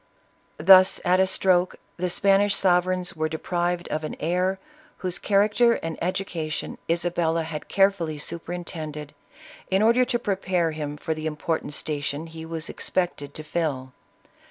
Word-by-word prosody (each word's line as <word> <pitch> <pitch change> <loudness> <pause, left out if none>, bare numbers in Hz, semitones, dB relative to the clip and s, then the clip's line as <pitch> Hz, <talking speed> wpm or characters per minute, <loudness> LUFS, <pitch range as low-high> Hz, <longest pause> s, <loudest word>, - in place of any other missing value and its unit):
Thus, 185 +3 +7
at 180 +1 +4
a 190 - +4
stroke, 185 -1 +2 0.2
the 180 0 -1
Spanish 195 +2 +3
sovereigns 185 0 +1
were 155 0 -1
de 160 - -3
prived 175 +1 -2
of 155 - -2
an 155 - -4
heir, 180 +4 0 0.4
whose 180 -1 -1
character 210 +4 +3
and 165 -6 -4
education 170 -4 -3
Isa 175 +1 0
bella 165 -1 0
had 160 -1 -6
carefully 195 -6 +2
superintended, 160 -2 -6 0.6
in 190 +2 +2
order 235 +3 +5
to 245 - 0
prepare 190 -6 0
him 150 -1 -5
for 160 - -2
the 155 0 -4
important 150 -1 -3
station 145 0 -3
he 160 0 -9
was 165 -1 -3
expected 170 -6 -3
to 155 - -7
fill. 145 -5 -3
175 Hz, 150 wpm, -25 LUFS, 155-185 Hz, 0.6 s, Thus